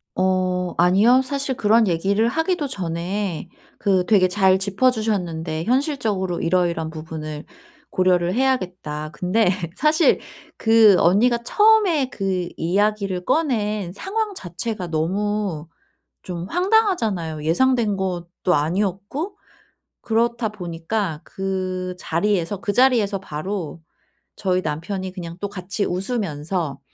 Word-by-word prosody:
어 185 -1 0
아니요. 200 +9 +5
사실 275 0 -2
그런 220 +1 +4
얘기를 195 +6 +1
하기도 320 +3 0
전에 180 -2 -3 0.3
그 190 -3 +2
되게 195 -3 +4
잘 190 0 +3
짚어 200 +6 +2
주셨는데 175 -8 -2
현실적으로 225 - 0
이러 175 +1 +2
이러한 160 -2 -3
부분을 155 -1 -7 0.4
고려를 180 -1 +2
해야겠다. 185 - -1
근데 180 +5 +1 0.3
사실 310 +3 +3 0.4
그 225 -3 +6
언니가 225 +8 +4
처음에 410 - +4
그 190 -3 -2
이야기를 195 +1 0
꺼낸 215 - 0
상황 420 - -3
자체가 185 - -5
너무 180 0 -1 0.6
좀 175 -2 -5
황당하잖아요, 340 - +1
예상된 230 +5 +2
것도 180 -1 -2
아니었고. 200 - -2 0.7
그렇다 235 0 0
보니까 175 -2 -3
그 185 -1 -3
자리에서, 195 +2 -1
그 205 -3 -1
자리에서 235 -6 +3
바로 170 -1 -5 0.5
저희 185 -2 0
남편이 185 +5 -4
그냥 170 -3 -7
또 200 - -2
같이 195 +1 -3
웃으면서 175 - -2
195 Hz, 265 characters per minute, -22 LUFS, 175-225 Hz, 0.7 s, 그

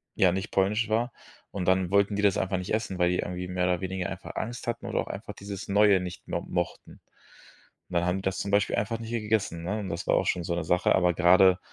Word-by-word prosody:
ja, 90 -2 +4
nicht 95 +3 -3
polnisch 105 +4 +1
war. 120 +3 +1 0.4
Und 95 -3 -3
dann 95 -1 +3
wollten 100 +1 +3
die 105 - -1
das 100 -2 +4
einfach 95 0 0
nicht 90 +3 -4
essen, 110 -4 -1
weil 90 0 +4
die 90 - 0
irgendwie 90 0 -3
mehr 90 0 -1
oder 90 0 0
weniger 95 -1 -3
einfach - - -8
Angst 120 +2 -4
hatten 120 0 -3
oder - - -1
auch - - -2
einfach - - -7
dieses 100 -1 -7
Neue 100 -1 +5
nicht 90 -1 -7
mo - - -2
mochten. 90 -1 -4 1.0
Und - - -11
dann 85 0 +2
haben 90 +1 +1
die 95 - -4
das 95 0 -1
zum 100 - -3
Beispiel 100 0 +2
einfach 110 +3 -1
nicht 115 0 -7
hier 115 -2 -2
gegessen, 105 -6 -1
ne? 105 +5 -2
Und 100 -3 -5
das 85 -1 -4
war - - +4
auch - - +1
schon 90 - 0
so 85 0 -2
'ne 85 - -2
Sache. 90 +2 +3
Aber 90 -1 +3
grade, 90 +1 +5
95 Hz, 260 wpm, -27 LUFS, 90-105 Hz, 1.0 s, Neue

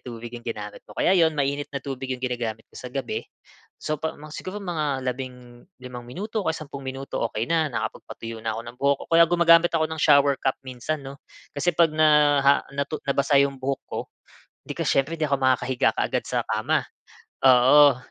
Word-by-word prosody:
tubig 120 -1 -8
yung 120 -1 -8
ginamit 105 -2 -6
mo. - - -14
Kaya - - +3
'yun, 165 -4 +3
mainit 140 0 -1
na 140 - -3
tubig 135 -1 -5
'yung 130 0 -3
ginagamit 115 -3 -3
ko - - -28
sa 125 - -7
gabi. 135 +1 -3 0.6
So 155 -1 -3
'pa 160 - -3
mga 150 +1 -11
siguro 185 +2 -6
mga 150 -7 -2
labing 125 -1 -6 0.2
limang 125 -1 -9
minuto, 210 - -4
o - - -2
kaya 160 - 0
sampung 140 -2 -8
minuto, 135 +1 -5
okey 110 - -2
na, 160 -2 +1
nakapagpatuyo 115 -2 -6
na 110 0 -3
ako - - -4
ng 120 +1 -10
buhok, 140 0 +2
o - - -50
kaya 165 0 +8
gumagamit 170 0 +5
ako 160 -1 +1
ng 160 - -4
shower 140 -1 +5
cap 135 - 0
minsan 135 +4 -4
'no. 135 +2 -9 0.3
Kasi 145 +5 -2
'pag 165 -2 +4
na 155 0 +4 0.4
ah, 140 +1 +4
natu 140 +2 -2
nabasa 140 +1 +2
'yong 140 -1 +1
buhok 135 +1 -2
ko, - - -5 0.7
'di - - -4
ka - - -2
siyempre 135 +4 +1
'di 155 - +2
ako 140 - +2
makakahiga 130 -1 +2
kaagad - - -1
sa - - 0
kama. - - +1 0.6
Oo. 130 +2 +7
140 Hz, 200 wpm, -24 LUFS, 125-155 Hz, 0.7 s, kaya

